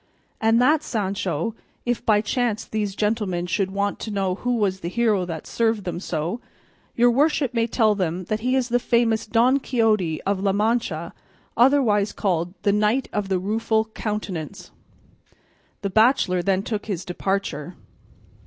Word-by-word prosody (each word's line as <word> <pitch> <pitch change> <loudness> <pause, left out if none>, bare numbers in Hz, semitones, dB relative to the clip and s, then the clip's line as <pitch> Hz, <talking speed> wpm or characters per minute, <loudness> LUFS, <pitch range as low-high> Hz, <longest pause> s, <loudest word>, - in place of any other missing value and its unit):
And 225 +1 +4
said 295 +5 +4
Sancho, 195 - -2 0.3
"If 240 -1 -1
by 210 -2 +3
chance 225 -1 -1
these 210 -3 -3
gentlemen 210 -5 -1
should 190 +2 0
want 200 +1 -2
to - - -5
know 195 -3 0
who 245 +6 -1
was 195 -4 0
the 170 - -5
hero 215 -3 +1
that 165 -3 -6
served 225 -3 0
them 175 -1 -4
so, 175 +5 -3 0.5
your 240 0 +5
worship 280 0 +2
may 230 -1 +1
tell 220 -2 +3
them 185 -2 -2
that 215 +4 -2
he 250 +3 0
is 255 -2 0
the 245 +1 +2
famous 230 -2 +1
Don 245 +5 +3
Quixote 215 - +1
of 200 -1 0
La 195 0 +1
Mancha, 205 -6 -1 0.4
otherwise 230 -5 +3
called 180 -2 -1
the 200 - +3
Knight 215 +5 +1
of 205 -2 -2
the 190 - +2
Rueful 220 +3 0
Countenance." 200 -4 -5 1.1
The 200 - -2
bachelor 215 -5 +3
then 195 +1 +1
took 215 -1 -4
his 190 -4 -3
departure. 180 -3 -3
210 Hz, 160 wpm, -23 LUFS, 190-230 Hz, 1.1 s, your